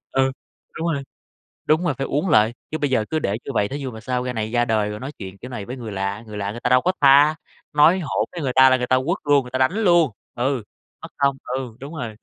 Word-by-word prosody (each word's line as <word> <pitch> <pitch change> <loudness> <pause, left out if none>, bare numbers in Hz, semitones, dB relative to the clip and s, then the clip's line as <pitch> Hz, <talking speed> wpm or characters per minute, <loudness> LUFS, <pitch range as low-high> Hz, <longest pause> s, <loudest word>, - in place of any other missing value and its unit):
Ừ, 135 0 +3 0.4
đúng 165 +2 -2
rồi. 140 -1 -3 0.6
Đúng 155 +3 +3
rồi, 165 - +1
phải 135 - -2
uốn 150 +6 -1
lại, 110 0 +4 0.2
chứ 155 - -1
bây 145 -2 -1
giờ 120 -5 +1
cứ 160 - 0
để 105 -6 -1
như - - -4
vậy 100 - +1
thí 140 - -5
dụ 135 -3 -5
mà 110 - -9
sau 125 +1 -2
ra 125 - -3
này 110 -1 -3
ra 120 0 +2
đời 110 -3 +1
rồi 105 0 -6
nói 135 +3 -6
chuyện 95 -1 -8
kiểu 125 - -10
này 105 -5 -5
với 125 +4 -7
người 115 -4 -7
lạ, 100 +1 -3
người 105 -1 -7
lạ 100 0 -2
người 115 - -7
ta 125 - -1
đâu 125 0 +5
có 180 - +2
tha, 145 +2 +6 0.4
nói 160 +5 +5
hỗn 155 - -1
với 175 - -6
người 135 -3 -1
ta 130 0 +8
là 130 - +4
người 125 -1 -2
ta 130 - +3
quất 175 +5 0
luôn, 145 -2 +3
người 125 - -11
ta 130 - -2
đánh 130 +7 +3
luôn. 175 - +3 0.2
Ừ, 130 -1 -1 0.4
mất - - -7
công, 140 -1 +2
ừ, 125 -2 -4
đúng 140 +4 -8
rồi. 120 -7 -5
130 Hz, 285 wpm, -22 LUFS, 110-145 Hz, 0.6 s, ta